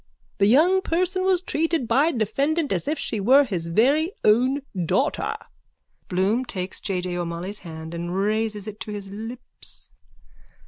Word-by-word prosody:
The 200 Hz, -, +5 dB
young 335 Hz, -, +5 dB
person 370 Hz, +2 st, 0 dB
was 375 Hz, -2 st, +3 dB
treated 325 Hz, -6 st, 0 dB
by 275 Hz, +8 st, +3 dB
defendant 280 Hz, +7 st, 0 dB
as 185 Hz, +4 st, -1 dB
if 305 Hz, +2 st, 0 dB
she 220 Hz, -, -2 dB
were 260 Hz, +8 st, +6 dB
his 180 Hz, -10 st, -3 dB
very 280 Hz, -, +3 dB
own 255 Hz, +6 st, +3 dB, 0.2 s
daughter. 275 Hz, -, 0 dB, 0.7 s
_(Bloom 195 Hz, +7 st, +1 dB
takes 185 Hz, -4 st, -4 dB
J. 185 Hz, -3 st, -2 dB
J. 180 Hz, -1 st, -3 dB
O'Molloy's 175 Hz, +4 st, -4 dB
hand 160 Hz, -1 st, -8 dB
and 170 Hz, +1 st, -4 dB
raises 210 Hz, +1 st, 0 dB
it 215 Hz, -1 st, -8 dB
to 215 Hz, -, -6 dB
his 200 Hz, -2 st, -6 dB
lips.) 225 Hz, +5 st, -8 dB
220 Hz, 150 wpm, -24 LUFS, 195-290 Hz, 0.7 s, were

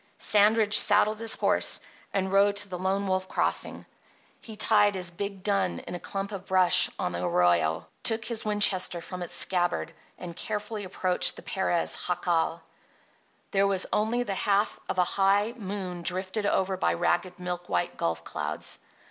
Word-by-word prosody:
Sandridge 210 Hz, 0 st, +4 dB
saddled 210 Hz, +1 st, +3 dB
his 225 Hz, -1 st, +3 dB
horse -, -, +1 dB, 0.3 s
and 190 Hz, 0 st, -1 dB
rode 200 Hz, +1 st, +4 dB
to 205 Hz, 0 st, -1 dB
the 180 Hz, -2 st, -6 dB
Lone 190 Hz, +2 st, -1 dB
Wolf 185 Hz, 0 st, -1 dB
Crossing. -, -, -1 dB, 0.5 s
He 220 Hz, -, -10 dB
tied 210 Hz, -1 st, +3 dB
his 180 Hz, -2 st, -4 dB
big 200 Hz, +1 st, -6 dB
dun 200 Hz, -, 0 dB
in -, -, -8 dB
a 175 Hz, -, -4 dB
clump 195 Hz, +3 st, -5 dB
of 195 Hz, -2 st, -7 dB
brush 185 Hz, -2 st, +4 dB
on -, -, -2 dB
the 85 Hz, +1 st, -4 dB
arroyo, 85 Hz, -2 st, +2 dB, 0.2 s
took 225 Hz, -1 st, 0 dB
his 230 Hz, -2 st, 0 dB
Winchester 205 Hz, -4 st, +3 dB
from 180 Hz, +2 st, -8 dB
its 175 Hz, -, -3 dB
scabbard, 175 Hz, -2 st, +1 dB, 0.2 s
and 170 Hz, -2 st, -8 dB
carefully 210 Hz, +1 st, -4 dB
approached 185 Hz, -1 st, 0 dB
the -, -, -11 dB
Perez 185 Hz, -3 st, -1 dB
jacal. 175 Hz, -2 st, 0 dB, 0.9 s
There 200 Hz, 0 st, +3 dB
was 195 Hz, -2 st, +2 dB
only 230 Hz, +3 st, +1 dB
the 205 Hz, -, -3 dB
half 200 Hz, +2 st, 0 dB
of -, -, -2 dB
a 180 Hz, -, +5 dB
high 200 Hz, +4 st, +1 dB
moon 190 Hz, -5 st, -5 dB
drifted 185 Hz, +4 st, -2 dB
over 190 Hz, -1 st, 0 dB
by -, -, +1 dB
ragged, 175 Hz, +1 st, 0 dB
milk 180 Hz, -1 st, -5 dB
white 90 Hz, 0 st, -1 dB
gulf 85 Hz, -1 st, -2 dB
clouds. -, -, -5 dB
190 Hz, 165 wpm, -27 LUFS, 175-205 Hz, 0.9 s, a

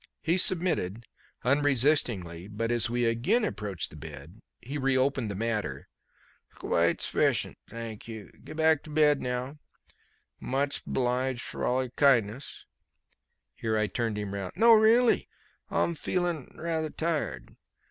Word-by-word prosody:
He 170 Hz, +3 st, +2 dB
submitted 165 Hz, -, +3 dB, 0.4 s
unresistingly, 125 Hz, -, +1 dB
but 115 Hz, +3 st, -3 dB
as 120 Hz, -1 st, 0 dB
we 120 Hz, 0 st, 0 dB
again 160 Hz, -, +2 dB
approached 100 Hz, -, -4 dB
the -, -, -12 dB
bed 75 Hz, +5 st, -10 dB, 0.2 s
he 140 Hz, +5 st, -5 dB
reopened 130 Hz, -3 st, +1 dB
the 100 Hz, -, -4 dB
matter. 105 Hz, -10 st, -3 dB, 0.7 s
"S'quite -, -, +1 dB
s'fficient, -, -, +1 dB, 0.2 s
thang 115 Hz, -2 st, -7 dB
you. 110 Hz, -3 st, -9 dB
Gebback 160 Hz, -1 st, +2 dB
to -, -, -10 dB
bed 150 Hz, -2 st, +3 dB
now. 125 Hz, +3 st, -4 dB, 0.8 s
Much 140 Hz, +2 st, -2 dB
'bliged 125 Hz, 0 st, -1 dB
frall 130 Hz, +1 st, -1 dB
your 125 Hz, -, -7 dB
kindness" 130 Hz, -3 st, +1 dB, 0.9 s
here 110 Hz, -, -2 dB
I 110 Hz, -, +2 dB
turned 110 Hz, 0 st, -2 dB
him 105 Hz, -1 st, -4 dB
round 100 Hz, -2 st, -5 dB
"no, 230 Hz, 0 st, +7 dB
really; 225 Hz, +2 st, +4 dB, 0.4 s
m'feeling 170 Hz, -2 st, -1 dB
rather 160 Hz, -1 st, -2 dB
tired. 150 Hz, -, -3 dB
125 Hz, 125 wpm, -28 LUFS, 110-155 Hz, 0.9 s, no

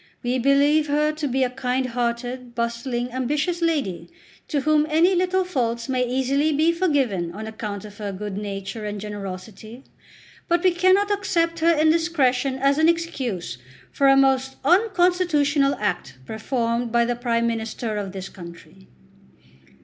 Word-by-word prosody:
We 250 Hz, +1 st, 0 dB
believe 285 Hz, +4 st, +3 dB
her 300 Hz, +1 st, +2 dB
to 305 Hz, -1 st, -3 dB
be 265 Hz, 0 st, +1 dB
a 255 Hz, -, +1 dB
kind 255 Hz, 0 st, -1 dB
hearted, 245 Hz, 0 st, -3 dB
bustling, 240 Hz, +1 st, -2 dB
ambitious 295 Hz, +7 st, -1 dB
lady, 290 Hz, -, -1 dB, 0.4 s
to 290 Hz, -3 st, -1 dB
whom 305 Hz, +1 st, +2 dB
any 330 Hz, +5 st, +4 dB
little 370 Hz, +1 st, +1 dB
faults 235 Hz, -8 st, -2 dB
may 255 Hz, -1 st, 0 dB
easily 265 Hz, +4 st, +1 dB
be 310 Hz, +3 st, +3 dB
forgiven 275 Hz, -, 0 dB
on 215 Hz, +3 st, -7 dB
account 215 Hz, -2 st, -6 dB
of 205 Hz, 0 st, -12 dB
her 205 Hz, -1 st, -4 dB
good 200 Hz, +1 st, -6 dB
nature 200 Hz, +1 st, -5 dB
and 210 Hz, 0 st, -4 dB
generosity. 205 Hz, +3 st, -8 dB, 0.6 s
But 345 Hz, 0 st, +1 dB
we 370 Hz, -, +5 dB
cannot 375 Hz, +4 st, +3 dB
accept 335 Hz, -5 st, 0 dB
her 335 Hz, +1 st, +4 dB
indiscretion 305 Hz, -5 st, +2 dB
as 275 Hz, +2 st, +2 dB
an 315 Hz, +1 st, +5 dB
excuse 265 Hz, -, -2 dB, 0.3 s
for 275 Hz, -, +2 dB
a 270 Hz, 0 st, +6 dB
most 265 Hz, -1 st, +2 dB
unconstitutional 350 Hz, -6 st, +3 dB
act 175 Hz, -11 st, -3 dB
performed 235 Hz, -, -2 dB
by 235 Hz, 0 st, +3 dB
the 240 Hz, +1 st, -1 dB
Prime 235 Hz, -1 st, 0 dB
Minister 225 Hz, -1 st, -3 dB
of 200 Hz, -2 st, -4 dB
this 190 Hz, 0 st, -6 dB
country." 170 Hz, -, -13 dB
260 Hz, 150 wpm, -23 LUFS, 225-310 Hz, 0.6 s, a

